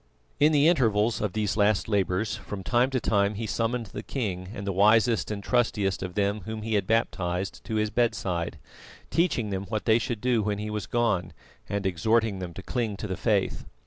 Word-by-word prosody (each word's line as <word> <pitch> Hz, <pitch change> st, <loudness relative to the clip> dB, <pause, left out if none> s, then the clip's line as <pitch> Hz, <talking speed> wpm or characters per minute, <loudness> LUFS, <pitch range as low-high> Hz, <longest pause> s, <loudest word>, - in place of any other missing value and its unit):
In 150 Hz, +2 st, +5 dB
the 145 Hz, 0 st, +4 dB
intervals 115 Hz, -8 st, +2 dB
of 105 Hz, -3 st, -1 dB
these 105 Hz, -1 st, 0 dB
last 105 Hz, -4 st, +2 dB
labours, 100 Hz, 0 st, 0 dB
from 100 Hz, -1 st, -7 dB
time 125 Hz, +4 st, +2 dB
to 135 Hz, -1 st, 0 dB
time 100 Hz, -2 st, +1 dB
he 110 Hz, +2 st, -3 dB
summoned 115 Hz, +2 st, -1 dB
the 105 Hz, -, -4 dB
king 95 Hz, -7 st, -4 dB
and 100 Hz, -2 st, -6 dB
the 100 Hz, -, 0 dB
wisest 110 Hz, +4 st, +4 dB
and 100 Hz, -2 st, -4 dB
trustiest 105 Hz, -6 st, +1 dB
of 90 Hz, -1 st, -5 dB
them 100 Hz, 0 st, 0 dB
whom 110 Hz, -1 st, -5 dB
he 110 Hz, 0 st, -2 dB
had 100 Hz, -3 st, +1 dB
baptised 95 Hz, -5 st, -1 dB
to 110 Hz, -, -3 dB
his 105 Hz, 0 st, 0 dB
bedside, 95 Hz, -8 st, -1 dB, 0.5 s
teaching 125 Hz, -, +1 dB
them 95 Hz, 0 st, -3 dB
what 110 Hz, +1 st, -3 dB
they 110 Hz, 0 st, +5 dB
should 115 Hz, -1 st, -3 dB
do 125 Hz, -1 st, +2 dB
when 105 Hz, 0 st, -1 dB
he 105 Hz, +1 st, -4 dB
was 105 Hz, -2 st, -4 dB
gone, 105 Hz, -8 st, 0 dB, 0.4 s
and 100 Hz, -1 st, -2 dB
exhorting 105 Hz, +3 st, +1 dB
them 90 Hz, -2 st, -5 dB
to 95 Hz, -, -8 dB
cling 115 Hz, -4 st, -2 dB
to -, -, -5 dB
the 95 Hz, -3 st, -3 dB
Faith. -, -, 0 dB
105 Hz, 205 wpm, -27 LUFS, 100-115 Hz, 0.5 s, In